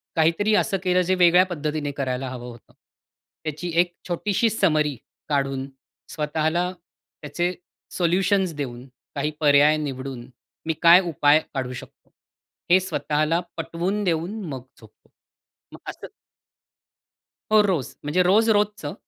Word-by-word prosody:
काहीतरी 170 +6 +2
असं 195 - +1
केलं 185 -1 +2
जे 185 - +2
वेगळ्या 180 0 +5
पद्धतीने 150 -4 -3
करायला 130 -2 -3
हवं 125 -1 -7
होतं, 120 -1 -15 0.7
त्याची 155 +3 -4
एक 175 0 +2
छोटीशी 205 +5 0
समरी 155 -9 +1 0.3
काढून, 135 -1 -1 0.4
स्वतःला 160 +3 -1 0.5
त्याचे 175 +5 -2 0.4
सोल्युशन्स 185 +1 +1
देऊन, 125 -3 -6 0.3
काही 150 +2 -1
पर्याय 150 0 +5
निवडून, 130 -4 -6 0.4
मी 160 - 0
काय 170 +1 +8
उपाय 145 0 +4
काढू 130 -2 -3
शकतो, - - -12 0.6
हे 185 - +7
स्वतःला 155 -2 0 0.2
पटवून 175 +5 -2
देऊन 175 +4 -1
मग 135 -6 -6 0.2
झोपतो. 110 -2 -20 0.6
मग - - -11
असं - - -8 1.4
हो, 215 -1 +7
रोज. 180 -10 -1
म्हणजे 150 +5 +1
रोज-रोजचं, 210 +1 +2
160 Hz, 120 wpm, -23 LUFS, 145-185 Hz, 1.4 s, काय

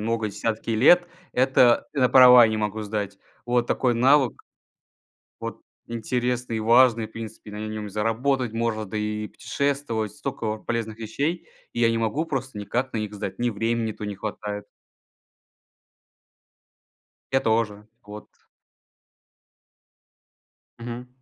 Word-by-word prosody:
много, 115 0 -1
десятки 110 +3 -3
лет. 150 +11 +5 0.3
Это, 125 -1 +4
на 130 -4 +3
права 125 -2 +9
я 110 - +2
не 110 - -1
могу 105 0 -2
сдать. 100 -1 -4 0.3
Вот 120 0 +1
такой 125 -2 +1
навык, 130 +2 +4 1.1
вот, - - -6 0.3
интересный 120 +1 -2
и - - -2
важный. 115 0 +4
В 110 - -21
принципе 110 -2 -9
на 105 +1 -5
нем 110 -1 -5
и - - -6
заработать 115 +4 0
можно, 115 -1 -1
да 105 +1 -6
и 105 0 -2
путешествовать. 140 -7 -2
Столько 135 -7 -4
полезных 110 0 -4
вещей, 140 +10 -3 0.3
и - - -6
я 115 - +5
не 115 - 0
могу 115 +8 0
просто 130 -7 -4
никак 125 +6 -2
на - - -3
них 105 -1 -4
сдать. 100 -2 -5
Ни 120 0 +1
времени 115 +1 -1
то 105 - -8
не 105 -1 -5
хватает. 105 0 -5 2.7
Я 135 - +4
тоже. 110 -3 0 0.2
Вот. 105 +1 -10 2.5
Мгм. 120 +1 -7
115 Hz, 135 wpm, -24 LUFS, 105-125 Hz, 2.7 s, права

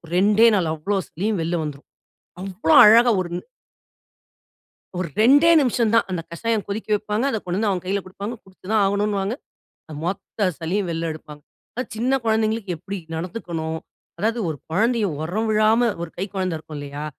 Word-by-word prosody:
2டே 210 +5 +5
நாள் 170 -5 +1
அவ்ளோ 160 +6 -2
சளியும் 200 +3 -2
வெளில 170 +2 -1
வந்துரும். 145 -2 -7 0.5
அவ்வளோ 195 - +1
அழகா 235 +3 +7
ஒரு 175 - -5 1.7
ஒரு 180 -1 -2
2டே 285 +8 +6
நிம்ஷம்தான். 230 -3 +2
அந்த 180 -2 -2
கஷாயம் 220 +4 -1
கொதிக்க 205 +2 -4
வைப்பாங்க 210 +3 -1
அத 220 - -1
கொண்டு 180 +1 -2
வந்து 215 0 +1
அவன் 185 -2 -2
கைல 195 +2 0
குடுப்பாங்க. 200 +5 -6
குடிச்சுதான் 195 +2 -1
ஆகணுன்னுவாங்க, 200 +1 0 0.6
அந்த 155 - -8
மொத்த 195 +2 -2
சளியும் 180 +4 -2
வெள்ல 165 0 -2
எடுப்பாங்க. 150 -1 -11 0.3
அது 250 - -2
சின்ன 250 +4 +1
குழந்தைகளுக்கு 220 -3 0
எப்படி 195 +5 -6 0.2
நடந்துக்கணும், 165 -3 -4 0.4
அதாவது 225 +3 0
ஒரு 155 -3 -4
கொழந்தையை 220 +4 +2
உரம் 210 +8 -2
விழாம 220 +2 +3
ஒரு 170 - -5
கை 190 - -1
கொழந்த 185 -3 -1
இருக்கும் 155 -1 -9
இல்லையா? 145 +1 -6
200 Hz, 155 wpm, -22 LUFS, 170-220 Hz, 1.7 s, அழகா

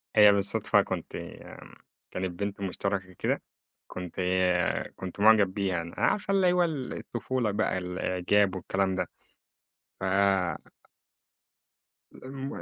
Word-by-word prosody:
هي 105 -1 +9
بالصدفة 100 0 +2
كنت - - -4 1.0
كانت 95 -1 -4
بنت 100 0 -3
مشترَكة 95 0 -2
كده، - - 0 0.5
كنت 90 0 -6 0.8
كنت 95 +1 -7
معجَب 105 -3 +5
بيها 100 -3 0
أنا، 85 - -2
يعني - - -2
عارفة 205 -1 -2
اللي 185 -2 +4
هو 180 -1 +3
ال 145 -6 -3
الطفولة 120 -1 -2
بقى 100 -2 0
الإعجاب 90 +2 +1
والكلام 95 +1 0
ده - - -1 0.9
ف - - -8 2.1
م 135 +1 -7
100 Hz, 115 wpm, -28 LUFS, 95-120 Hz, 2.1 s, هي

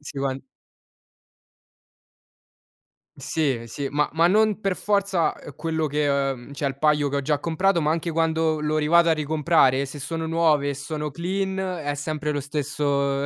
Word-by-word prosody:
Sì, 145 -1 -8
one 135 -1 -2 2.7
Sì, 140 -7 -1
sì, 140 +4 -4
ma 150 0 +1
ma 165 +2 +3
non 215 +2 +3
per 195 -2 0
forza, 200 -5 +1
uhm, 145 - -11
quello 160 0 -2
che, 150 0 0
uhm, 135 -2 -1
cioè 140 0 -3
il 135 0 -3
paio 150 -1 +3
che 140 - -2
ho - - -2
già 145 +1 0
comprato, 170 +4 +1
ma 155 0 +2
anche 165 +1 -2
quando 160 -1 +1
lo 150 0 -1
rivado 170 +3 +4
a 165 - +5
ricomprare, 150 -3 +2
se 145 +2 -8
sono 165 +3 -3
nuove 160 -3 +2
e - - -3
sono 150 +1 -4
clean, 190 +3 -2
è 175 -6 -2
sempre 150 +1 -3
lo 145 - -2
stesso 140 -1 -1
150 Hz, 165 wpm, -24 LUFS, 140-165 Hz, 2.7 s, a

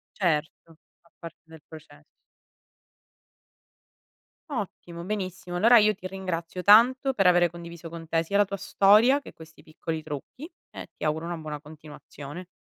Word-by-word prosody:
Certo, 165 -2 -2 0.2
fa 170 - -28
parte 165 -1 -10
del 160 -1 -15
processo. 150 -2 -14 2.5
Ottimo. 175 -8 -6
Benissimo, 185 -3 -5
allora 230 +7 +6
io 215 -1 +4
ti 185 - -14
ringrazio 185 -2 -5
tanto 250 +6 +5
per 195 -6 +2
avere 175 -1 +4
condiviso 170 0 -10
con 165 0 -9
te 165 +1 0
sia 185 +5 -5
la 205 - +5
tua 200 0 -5
storia, 215 +9 +4
che - - -12
questi 160 0 -16
piccoli 160 0 -6
trucchi, 160 - -8 0.2
e - - -9
ti - - -9
auguro 155 +2 -1
una 170 0 -4
buona 150 -2 -7
continuazione. 150 +1 -11
170 Hz, 150 wpm, -26 LUFS, 160-200 Hz, 2.5 s, allora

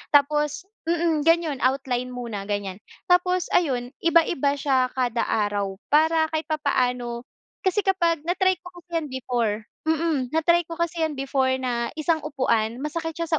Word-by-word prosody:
Tapos 295 +3 +2 0.2
mm, 335 -3 +1
gano'n 330 -5 +3
outline 255 -1 0
muna 235 -5 -5
gan'yan. 200 -2 -3 0.3
Tapos, 360 0 +3
ayun 250 -7 +1
iba-iba 330 -4 +3
siya 260 -3 +2
kada 245 -2 0
araw 205 -2 0 0.2
para 315 +2 +4
kahit 315 0 -1
papaano. 250 -5 0 0.4
Kasi 375 +2 +2
kapag 340 -4 +2
na-try 370 +1 +2
ko 355 0 -11
kasi 350 - -56
'yan 305 - -6
before, 240 -4 -1 0.3
mm. 315 -5 0
Na-try 340 +2 +4
ko 330 - -6
kasi 340 0 -1
'yan 315 - 0
before 265 -1 +1
na 240 -2 -1
isang 320 +1 +1
upuan 240 -5 0
masakit 325 +1 -3
siya 335 -1 -3
290 Hz, 150 wpm, -24 LUFS, 250-335 Hz, 0.4 s, para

